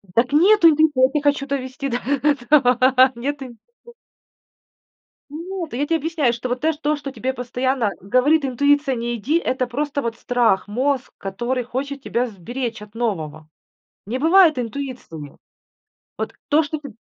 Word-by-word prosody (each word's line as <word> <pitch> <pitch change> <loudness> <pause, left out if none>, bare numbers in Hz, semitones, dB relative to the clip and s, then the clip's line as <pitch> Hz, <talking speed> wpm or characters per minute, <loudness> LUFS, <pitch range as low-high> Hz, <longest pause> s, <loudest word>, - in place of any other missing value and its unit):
Дак 240 +3 +3
нету 365 +4 +6
интуиции, 305 -3 +3
я - - +1
те 300 - +1
хочу 285 -1 +1
довести 275 0 -4
до 245 - -1
этого. 260 -1 +3
Нету 275 +3 -4
инт 240 -2 -12 1.7
Нет, 335 0 -6
я 280 +4 -1
тебе 330 - +2
объясняю, 315 -6 0
что 240 +1 -5
вот 250 +2 -2
тэ 320 - +2
то, 300 0 -1
что 285 -2 -7
тебе 260 +2 -3
постоянно 250 -2 -1
говорит 265 - +2
интуиция: 285 +1 +2
"Не 240 0 -3
иди", 265 +9 0
это 255 -5 -1
просто 285 +3 -2
вот 235 -2 -3
страх, 235 -6 +1
мозг, 260 +4 -1
который 240 +6 -3
хочет 275 +3 -5
тебя 245 0 -1
сберечь 230 +3 -5
от 210 0 -12
нового. 160 -10 -4 0.6
Не 245 +5 -3
бывает 330 0 +5
интуиции 250 -4 -5
у - - -7
него. 145 -1 -11 0.8
Вот - - -4
то, 300 +2 +4
что 310 +1 -4
ты 280 -6 -11
260 Hz, 160 wpm, -21 LUFS, 240-290 Hz, 1.7 s, нету